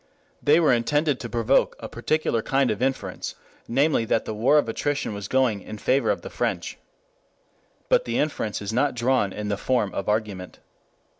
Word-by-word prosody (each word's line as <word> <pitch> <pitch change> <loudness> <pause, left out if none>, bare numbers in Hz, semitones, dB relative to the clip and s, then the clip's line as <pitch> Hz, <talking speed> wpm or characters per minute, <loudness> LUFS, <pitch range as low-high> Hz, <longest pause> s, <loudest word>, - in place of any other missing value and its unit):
They 150 +3 +5
were 155 -6 +4
intended 145 +4 +1
to 120 - -6
provoke 120 +3 +2
a 110 - -6
particular 120 0 0
kind 135 +2 +1
of 105 - -4
inference, 130 -8 -2 0.3
namely 135 +1 +2
that 115 - 0
the 110 - -4
war 120 +8 +3
of 145 - +2
attrition 140 +1 -2
was 100 -1 -6
going 125 -6 +1
in 110 - -8
favor 130 +6 +1
of - - 0
the - - -8
French. - - -3 1.1
But - - +3
the - - -1
inference 110 -9 -1
is 100 +2 -4
not 135 +3 +1
drawn 120 -4 +1
in 105 +1 -5
the 100 - -1
form 110 -3 0
of 100 - -3
argument. 105 -4 -2
120 Hz, 180 wpm, -24 LUFS, 105-140 Hz, 1.1 s, They